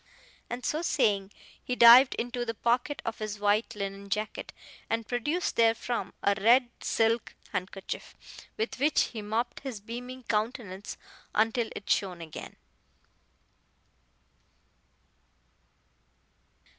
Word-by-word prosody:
And 245 +1 -5
so 310 - 0
saying, 205 - +1 0.3
he 250 - -2
dived 245 +3 +9
into 245 +1 -2
the 230 -1 -3
pocket 245 +6 0
of 225 - -3
his 215 -1 -4
white 205 +2 +1
linen 200 0 -5
jacket, 215 +2 -3 0.4
and 225 -1 -1
produced 295 +9 -1
therefrom 230 +1 +1
a 200 - +4
red 240 +3 +5
silk 225 0 +1 0.2
handkerchief, 190 +1 -5 0.4
with 440 - -2
which 295 +3 +3
he 220 - -4
mopped 225 +4 -2
his 260 -6 -6
beaming 245 +4 -7
countenance 210 -3 -3 0.4
until 225 +1 +2
it 200 - -8
shone 185 -3 +1
again. 160 -2 -8
230 Hz, 110 wpm, -29 LUFS, 205-245 Hz, 0.4 s, dived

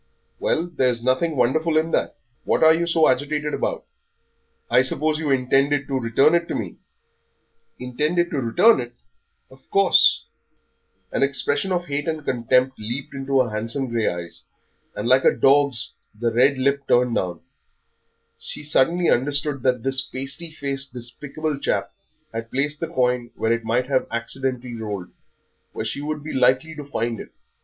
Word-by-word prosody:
"Well, 165 - 0
there's 125 -9 0
nothing 130 +6 +1
wonderful 155 +6 +2
in 160 +1 +1
that. - - 0 0.3
What - - +1
are 160 0 +8
you 170 +1 0
so 165 -2 +4
agitated 145 +3 0
about? - - -2 0.8
I 125 - +4
suppose 150 +4 0
you 155 -2 -2
intended 135 +2 +2
to 135 -1 -1
return 125 +6 +3
it 170 0 +2
to - - -3
me?" - - -5 1.0
"Intended 150 +8 -1
to 145 - -1
return 180 - +4
it! 120 0 -6 0.6
Of 130 0 -20
course." 195 -1 +4 0.9
An - - -1
expression 140 +6 +1
of 175 -1 0
hate 145 -1 -3
and 155 -2 -3
contempt 130 +2 +1
leaped 120 +6 -5
into 135 -1 +1
her 120 -3 -2
handsome 115 +5 -2
grey 115 -2 0
eyes, 85 -1 -4 0.5
and, 105 - -3
like 130 +1 +4
a - - +7
dog's, 140 -4 +3 0.3
the 120 0 0
red 130 +4 +4
lip 140 +1 0
turned 125 -1 +3
down. 90 -5 -2 1.0
She - - -4
suddenly 165 +4 +2
understood 145 +2 +1
that 125 -2 +1
this 135 -1 +1
pasty 140 +6 -5
faced, 140 -3 -5
despicable 140 +5 -4
chap - - -1 0.4
had 115 0 -5
placed 145 +4 -1
the 165 - -3
coin 125 -6 0
where 115 +1 +1
it 115 0 -2
might 115 +3 0
have 130 -1 0
accidentally 125 +1 -3
rolled, 105 -5 -5 0.6
where 110 - -4
she 115 +6 -3
would 150 0 -4
be 155 - -6
likely 130 +4 +2
to 150 -1 -7
find 120 -4 -3
it. - - -9
135 Hz, 165 wpm, -22 LUFS, 120-150 Hz, 1.0 s, are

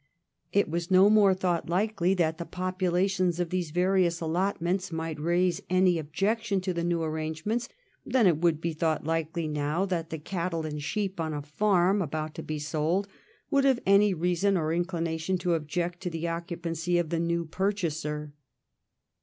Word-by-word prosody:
It 200 +2 +3
was 170 +2 -3
no 190 +2 +6
more 205 -3 +5
thought 180 -3 -1
likely 190 0 +1
that 160 -2 0
the 170 - -4
populations 185 0 0
of 175 -2 -1
these 180 -3 -1
various 180 0 +2
allotments 180 +2 -1
might 160 -1 -4
raise 175 +2 +1
any 185 -2 +3
objection 195 +7 0
to 185 0 -2
the 170 0 -2
new 170 -1 0
arrangements 160 +9 -2 0.3
than 255 -4 +2
it 170 -5 +4
would 165 -2 +2
be 165 0 -2
thought 155 0 0
likely 165 +1 -1
now 150 +4 -1
that 170 -4 -2
the 160 - -4
cattle 170 0 -3
and 150 -1 -4
sheep 195 +3 -2
on 160 -2 -2
a 145 - -4
farm 190 +5 +2
about 155 -1 -3
to - - -6
be 155 - -4
sold 155 +6 -1 0.4
would 280 -2 +3
have 265 -3 +3
any 200 +1 +5
reason 180 +3 +1
or 155 -2 0
any 170 - +1
inclination 170 0 -1
to 175 0 0
object 170 +3 -2
to 180 - -2
the 165 -1 -5
occu 170 +1 -3
pancy 170 +1 -1
of 170 -2 -2
the 165 - 0
new 170 0 0
purchaser. 155 -5 -2
170 Hz, 180 wpm, -28 LUFS, 160-185 Hz, 0.4 s, no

